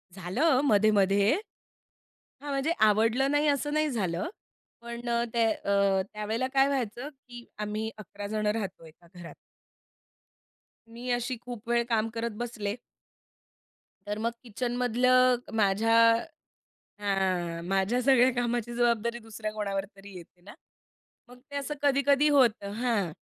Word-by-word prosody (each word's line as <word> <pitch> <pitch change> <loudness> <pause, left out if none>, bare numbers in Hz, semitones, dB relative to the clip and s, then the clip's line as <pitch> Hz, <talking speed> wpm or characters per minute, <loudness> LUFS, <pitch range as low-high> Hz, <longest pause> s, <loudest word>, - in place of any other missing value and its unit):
झालं 255 - +1
मध्ये-मध्ये 205 -2 +3 1.1
हां. 290 - -5
म्हणजे 275 +3 0 0.2
आवडलं 225 +6 +2
नाही 295 +1 +2
असं 290 +1 0
नाही 305 0 +1
झालं, 185 - -2 0.5
पण 235 0 -6
अ, 235 0 +1
त्या 230 -1 +3
अ, 200 -2 +1
त्यावेळेला 220 +4 -2
काय 270 0 +4
व्हायचं, 255 0 -3
की 245 -4 -14
आम्ही 210 +1 -3
11 205 0 -8
जण 215 0 -2
राहतो 200 -6 -3
एका 165 +2 -18
घरात. 175 -2 -11 1.5
मी 240 +2 -8
अशी 245 +1 -1
खूप 240 -2 -9
वेळ 235 0 +2
काम 225 -1 +1
करत 230 0 -3
बसले. 215 -4 -4 1.3
तर 205 +1 -3
मग 230 +1 0
किचनमधलं 250 +2 +2 0.2
माझ्या 215 +2 +2 1.1
हां, 185 -4 -1
माझ्या 195 +6 +1
सगळ्या 260 0 +5
कामाची 240 -1 -2
जबाबदारी 235 -1 +1
दुसऱ्या 220 -1 -6
कोणावर 200 -2 -2
तरी 195 -1 -12
येते 175 +1 -14
ना. 205 +6 -13 0.7
मग 250 0 -15
ते 285 - -6
असं 280 +1 -3
कधी-कधी 280 +1 +3
होतं. 235 -8 +3
हां, 215 -7 -1
230 Hz, 130 wpm, -28 LUFS, 205-250 Hz, 1.5 s, सगळ्या